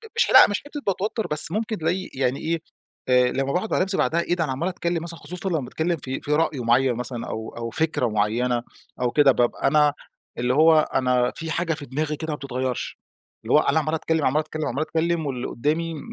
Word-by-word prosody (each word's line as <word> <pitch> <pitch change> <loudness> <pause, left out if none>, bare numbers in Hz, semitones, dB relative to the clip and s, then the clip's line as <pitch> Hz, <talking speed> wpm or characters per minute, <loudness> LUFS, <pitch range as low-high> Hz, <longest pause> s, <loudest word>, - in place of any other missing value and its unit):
مش 470 - +4
ح - - -2
لأ - - +8
مش 205 - -2
حتة 290 0 -7
باتوتر 210 +3 -1
بس، 150 +1 +6
ممكن 220 +2 -2
تلاقي 175 +4 -2
يعني 130 0 -1
إيه، 165 0 -2 0.5
آآ 125 0 +5
لما 135 0 -1
باقعد 185 +5 -2
مع - - +2
نفسي 190 +1 0
بعدها 170 +2 +1
إيه 175 - -1
ده 170 - 0
أنا 150 - -2
عمّال 135 +7 -2
أتكلم 170 -2 -2
مثلًا 170 -1 -7
خصوصًا 180 +2 -5
لما 160 -3 0
باتكلم 160 +6 -2
في 135 -1 -5
في 145 - -5
رأي 155 -4 0
معّين 125 +2 +2
مثلًا، 120 -1 -5
أو 110 0 -6
أو 115 0 -4
فكرة 155 -1 0
معينة 115 +3 0 0.4
أو 125 -1 +1
كده 145 -2 +5
بابقى 120 -2 0
أنا 150 -1 +4 0.4
اللي 125 +1 0
هو 160 +2 +6
أنا 125 -4 +1
في 165 -1 -5
حاجة 165 -1 0
في 145 -2 -7
دماغي 150 +4 -2
كده 160 +2 -6
ما - - -2
بتتغيرش، 130 -3 -4 0.4
اللي - - -1
هو - - +7
أنا 160 - +2
عمّال 155 0 -2
أتكلم، 160 -1 -1
عمّال 145 +4 +2
أتكلم، 155 0 -4
عمّال 135 +5 -2
أتكلم 165 +1 -1
واللي 130 -3 -3
قدامي 160 +6 -1
م 155 - -7
155 Hz, 225 wpm, -23 LUFS, 130-165 Hz, 0.5 s, لأ